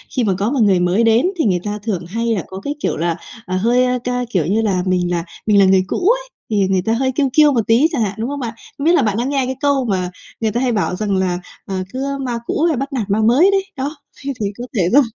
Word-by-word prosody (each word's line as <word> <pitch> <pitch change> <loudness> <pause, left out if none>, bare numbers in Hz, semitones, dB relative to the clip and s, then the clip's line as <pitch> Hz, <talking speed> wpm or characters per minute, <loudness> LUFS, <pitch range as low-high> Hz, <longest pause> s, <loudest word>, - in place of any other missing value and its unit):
khi 255 - +2
mà 200 -4 +2
có 205 +5 0
mà 275 - 0
người 200 -5 +4
mới 180 +5 +2
đến 230 +4 +4
thì 320 - +1
người 185 -4 +2
ta 210 0 -3
thường 195 -6 -2
hay 225 +7 -3
là 185 - -2
có 190 - -7
cái 285 - -3
kiểu - - -1
là, 170 +1 0 0.3
ờ, 185 +1 -2
hơi, 240 +6 +3
a, 250 0 +1
ca 250 0 -1
kiểu 180 -9 0
như 205 +7 +1
là 190 -5 0
mình 180 -1 +1
là 170 -1 0 0.2
mình 210 -2 +4
là 195 - +6
người 190 0 +4
cũ 370 - +1
ấy, - - 0 0.2
thì 205 -3 +2
người 190 -1 +1
ta 220 +5 0
hơi 260 +3 +1
kiêu 275 +2 +1
kiêu 300 0 +6
một 235 -5 0
tí 235 +7 +5
chẳng 290 -8 -1
hạn, 205 -3 0
đúng 225 +3 -2
hông 285 0 -4
bạn? 240 -3 -4 0.2
Không 280 - -4
biết 335 - +5
là - - +4
bạn 210 -2 0
đã 240 - 0
nghe 275 -1 0
cái 260 +1 -3
câu 280 -2 +1
mà 185 -4 -1 0.3
người 220 -1 0
ta 240 +4 -1
hay 255 -2 +1
bảo 200 -4 0
rằng 205 0 -1
là, 180 -2 0 0.3
ờ, 195 - -4 0.2
cứ 275 +2 -2
"ma 245 -3 -2
cũ 305 - -1
hay 330 -5 +2
bắt 275 +3 -4
nạt 225 -6 -2
ma 205 +2 +2
mới" 260 - +5
đấy, 390 -1 +1
đó, 280 +4 -3 0.3
thế 275 0 -3
thì - - +1
có 240 - -5
thể 200 - +2
do 285 - +8
230 Hz, 295 wpm, -18 LUFS, 195-270 Hz, 0.3 s, do